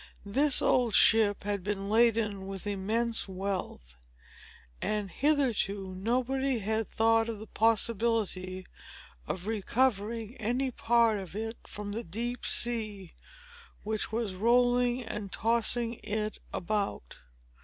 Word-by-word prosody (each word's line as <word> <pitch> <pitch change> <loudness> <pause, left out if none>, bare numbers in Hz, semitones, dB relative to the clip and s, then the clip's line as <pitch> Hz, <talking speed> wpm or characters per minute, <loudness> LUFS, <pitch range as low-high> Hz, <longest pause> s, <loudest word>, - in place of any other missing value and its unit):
This 275 +7 +3
old 240 -4 +3
ship 220 -3 +5
had 200 -2 -2
been 200 0 -3
laden 215 -3 +2
with 195 0 -6
immense 215 +4 -1
wealth; 185 - -5 0.9
and, 210 -3 -2
hitherto, 230 -10 0
nobody 255 +6 0
had 220 +1 -1
thought 225 0 +2
of 225 - -4
the 215 - -9
possibility 220 -4 0 0.6
of 185 0 -4
recovering 225 +1 0
any 245 +4 -1
part 230 -2 +2
of 190 -1 -9
it 225 +2 -4
from 205 0 -6
the 225 +3 -4
deep 235 +8 -4
sea, 215 -6 -1 0.7
which 215 0 -2
was 220 -3 -2
rolling 245 +4 +2
and 210 -3 -5
tossing 230 +1 0
it 215 0 -3
about. 200 - -3
220 Hz, 115 wpm, -30 LUFS, 200-235 Hz, 0.9 s, ship